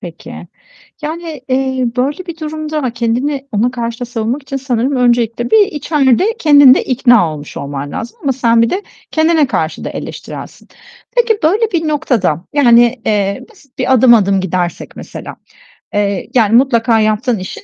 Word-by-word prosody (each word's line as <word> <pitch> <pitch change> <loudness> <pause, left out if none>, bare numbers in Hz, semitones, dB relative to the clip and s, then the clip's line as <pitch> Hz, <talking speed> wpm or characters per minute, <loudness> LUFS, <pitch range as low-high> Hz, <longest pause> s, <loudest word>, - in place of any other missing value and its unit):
Peki. 170 -2 -10 0.7
Yani, 315 -2 -6
eee, 260 -1 0
böyle 285 +8 -1
bir 340 -2 -7
durumda 310 0 -4
ama 260 -5 -1
kendini 260 +4 -2
ona 230 +4 +1
karşı 235 -1 -4
da 245 - -3
savunmak 240 +4 -3
için 275 0 -5
sanırım 260 0 -1
öncelikle 240 - +1
bir 425 -2 +5
içeride 290 - +1
kendin 285 -4 +7
de - - 0
ikna 240 - +3
olmuş 145 -1 -9
olman 140 0 -5
lazım. 230 0 -6
Ama 275 - +1
sen 235 -2 +2
bir 230 - +2
de 390 +3 -2 0.3
kendine 315 -2 +2
karşı 160 -10 -2
da - - -4
eleştirelsin. - - -8 0.5
Peki 470 -3 +2
böyle 425 +7 +2
bir 325 -3 -1
noktada, 225 - 0
yani, 240 -3 +4
eee, 200 -2 -1
basit 285 - -23
bir 255 +1 +2
adım 250 -1 +6
adım 195 -3 +3
gidersek 180 -1 -3
mesela, - - -9 0.6
eee, 200 -2 -1
yani 225 -2 +3
mutlaka 235 -3 +3
yaptığın 215 +1 0
işin 185 - -8
250 Hz, 165 wpm, -14 LUFS, 225-290 Hz, 0.7 s, kendin